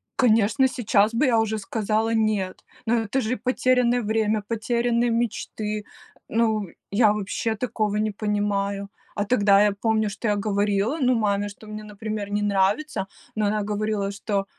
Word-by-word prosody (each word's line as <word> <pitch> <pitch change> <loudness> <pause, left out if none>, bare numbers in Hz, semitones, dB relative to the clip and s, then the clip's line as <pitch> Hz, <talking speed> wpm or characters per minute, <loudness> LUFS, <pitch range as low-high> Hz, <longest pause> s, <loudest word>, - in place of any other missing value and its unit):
Конечно, 230 +2 +4
сейчас 220 -3 +2
бы 260 +6 +2
я 230 -2 +4
уже 220 0 0
сказала 220 +2 -1
"нет", 215 -4 0 0.2
но 230 +2 +2
это 255 +6 -1
же 245 +3 -1
потерянное 250 0 +2
время, 215 -1 +1
потерянные 235 +2 0
мечты, 215 -2 -2 0.4
ну, 220 -3 +1 0.2
я, 210 0 +4
вообще, 210 +2 -2
такого 215 -2 -1
не 215 0 0
понимаю. 200 -1 -1 0.3
А 205 - -1
тогда 200 -3 +4
я 210 - +3
помню, 220 +1 0
что 210 +3 -4
я 205 - +2
говорила, 205 +5 0
ну, 255 -1 +3
маме, 205 -2 0
что 210 +2 -13
мне, 215 0 -7
например, 210 -1 -5
не 205 - 0
нравится, 200 +4 0 0.3
но 215 - +1
она 210 0 0
говорила, 210 -1 -1
что: 200 -1 -2
215 Hz, 155 wpm, -24 LUFS, 205-230 Hz, 0.4 s, Конечно